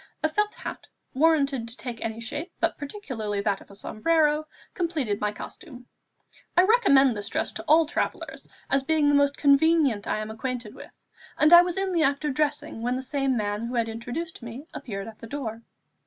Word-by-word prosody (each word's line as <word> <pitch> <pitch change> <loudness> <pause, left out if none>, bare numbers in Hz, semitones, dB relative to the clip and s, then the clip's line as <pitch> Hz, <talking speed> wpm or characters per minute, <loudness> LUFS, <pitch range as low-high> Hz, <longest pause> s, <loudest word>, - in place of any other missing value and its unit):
A - - +5
felt 420 +7 0
hat, - - -7 0.3
warranted 280 -4 +2
to 230 - -7
take 240 -3 -6
any 225 0 -3
shape, 290 - -5
but - - +1
particularly 255 - -4
that 200 -1 0
of - - -16
a 200 - -13
sombrero, 305 +8 +1 0.3
completed 300 - -1
my 210 0 +1
costume. 250 - -10 0.7
I 360 - +8
recommend 280 - +5
this 205 -1 -4
dress - - -1
to 220 - -7
all 320 +2 +6
travellers - - -3 0.2
as 275 - +2
being 295 +1 +2
the - - +3
most 285 0 +3
convenient 280 -6 +3
I - - 0
am 215 0 -4
acquainted 235 -1 -4
with, - - -11 0.5
and 305 +3 +5
I 345 - +11
was 355 0 -2
in 385 -1 0
the 340 -2 +1
act 280 0 +1
of 295 - 0
dressing, 295 -3 -1
when 245 +2 0
the 260 - -3
same 270 -1 0
man 205 +1 -2
who 245 - -4
had 230 -1 +1
introduced 245 +10 -5
me 240 +5 -8
appeared 195 -5 -6
at 220 -1 -11
the 230 - -9
door. 230 -4 -5
275 Hz, 200 wpm, -26 LUFS, 225-310 Hz, 0.7 s, I